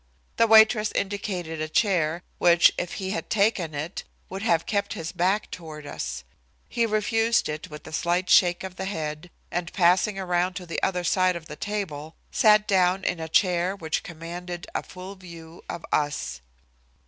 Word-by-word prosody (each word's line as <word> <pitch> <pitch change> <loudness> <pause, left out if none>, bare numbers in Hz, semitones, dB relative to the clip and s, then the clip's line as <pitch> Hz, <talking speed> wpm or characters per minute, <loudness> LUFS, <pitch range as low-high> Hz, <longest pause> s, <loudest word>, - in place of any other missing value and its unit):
The 230 - +5
waitress 220 -1 +6
indicated 185 -5 -3
a 155 - -3
chair, 175 -3 +1 0.2
which, 175 0 +6
if 175 - -4
he 190 -1 -4
had 210 - -4
taken 200 -7 +1
it, 155 +6 -4 0.3
would 190 +1 -6
have 170 -7 +2
kept 200 -1 -1
his 165 0 -5
back 190 +4 0
toward 155 -4 -8
us. 65 - -5 0.4
He 235 -1 0
refused 225 +2 +1
it 150 0 -5
with 150 -1 -10
a - - -10
slight 175 +2 0
shake 175 -1 +4
of 185 -1 -7
the 190 - -3
head, 160 -3 -4 0.2
and 175 0 -3
passing 185 +3 +3
around 180 -1 0
to 185 - -6
the 165 - -4
other 180 -2 0
side 185 +1 +2
of 170 -2 -7
the 150 - -8
table, 160 -6 -4 0.2
sat 210 -1 +5
down 185 -1 +3
in 180 - -1
a 160 0 -5
chair 180 +2 +2
which 160 -4 -2
commanded 175 +1 -7
a - - -1
full 185 +2 -9
view 170 -3 -12
of 170 - -5
us. 145 - -1
180 Hz, 175 wpm, -25 LUFS, 165-195 Hz, 0.4 s, waitress